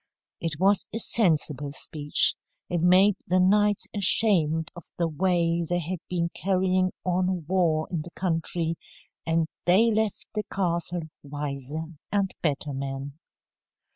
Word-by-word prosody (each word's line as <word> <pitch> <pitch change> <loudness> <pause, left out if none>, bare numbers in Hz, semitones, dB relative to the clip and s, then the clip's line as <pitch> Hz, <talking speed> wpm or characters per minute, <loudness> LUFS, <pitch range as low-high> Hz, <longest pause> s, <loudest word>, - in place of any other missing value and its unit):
It 160 -3 -3
was 195 +2 +3
a - - -3
sensible 155 - +2
speech. 150 -1 0 0.4
It 175 -2 0
made 185 +3 +5
the 185 +1 +2
knights 205 +2 +3
ashamed 170 -6 +3
of 175 - -10
the 170 - +1
way 170 +1 +1
they 175 - +1
had 175 +1 -3
been 170 -2 -1
carrying 185 0 +1
on 180 -2 0
war 165 -3 +1
in 170 -4 -1
the 165 - -9
country, 165 -2 -2 0.5
and 165 0 +2 0.2
they 210 +6 +5
left 215 -1 -1
the 215 - -1
castle 175 -2 -1 0.2
wiser 145 +1 -4 0.3
and 200 -2 0
better 145 -2 -1
men. 135 +2 -5
175 Hz, 135 wpm, -26 LUFS, 155-185 Hz, 0.5 s, made